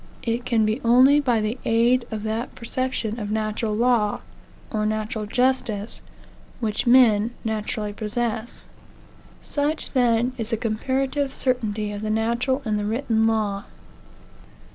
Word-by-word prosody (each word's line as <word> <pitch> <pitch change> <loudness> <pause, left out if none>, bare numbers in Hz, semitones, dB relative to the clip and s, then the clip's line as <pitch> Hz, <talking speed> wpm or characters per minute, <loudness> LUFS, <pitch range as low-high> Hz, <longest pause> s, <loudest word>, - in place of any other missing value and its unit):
It 235 +1 -2
can 225 -3 +2
be 215 +5 -1
only 255 +5 +6
by 245 -6 +1
the 215 +4 -2
aid 235 +2 +2
of 215 -2 -5
that 220 +3 -3
perception 240 -2 -3
of 205 -2 -4
natural 215 0 -1
law, 230 -3 +2 0.5
or 215 -1 -1
natural 215 0 -2
justice, 235 -3 0 0.6
which 220 0 -1
men 235 -2 +5
naturally 215 -1 -2
possess. 220 +2 -3 0.7
Such, 295 +2 -1
then, 245 -1 +2
is 225 -1 -2
the 225 - +1
comparative 265 +5 -1
certainty 215 -5 -1
of 205 0 -5
the 215 - -3
natural 235 +5 0
and 210 -1 0
the 205 - -2
written 225 0 +1
law. 210 -3 0
225 Hz, 135 wpm, -23 LUFS, 215-250 Hz, 0.7 s, only